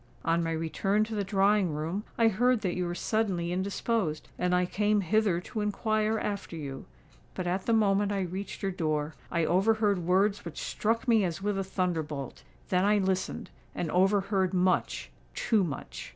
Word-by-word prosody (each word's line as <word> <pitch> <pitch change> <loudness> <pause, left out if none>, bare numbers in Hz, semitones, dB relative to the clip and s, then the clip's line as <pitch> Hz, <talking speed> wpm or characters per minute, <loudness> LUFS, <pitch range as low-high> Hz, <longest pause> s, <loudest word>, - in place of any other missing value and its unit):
On 165 +1 +2
my 165 - -1
return 180 +6 0
to 220 +1 -5
the 205 -2 0
drawing 195 -2 +2
room, 165 +7 -3
I 230 - +5
heard 240 +3 +2
that 185 -4 -1
you 180 -1 -1
were 175 - -3
suddenly 190 -5 -1
indisposed; 190 -2 -1
and 180 0 +2
I 180 0 +2
came 210 +3 +1
hither 195 -1 +2
to 215 +4 -5
inquire 215 +1 0
after 200 -5 -4
you. 140 -4 -6 0.5
But 185 - -3
at 180 +2 -2
the 230 - +3
moment 205 -2 +3
I 200 -1 0
reached 190 +3 -5
your 195 - 0
door, 155 -3 -1 0.2
I 170 -1 +1
overheard 205 +3 +2
words 190 +4 +2
which 170 -3 -8
struck 230 +3 -1
me 225 -3 +4
as 180 +1 -3
with 205 -1 0
a - - 0
thunderbolt. 160 -8 -3 0.3
Then 180 0 +2
I 210 +1 +4
listened—and 190 -3 -3
overheard 195 0 +2
much—too 185 +3 0
much!" 155 -6 -6
190 Hz, 170 wpm, -29 LUFS, 175-210 Hz, 0.5 s, I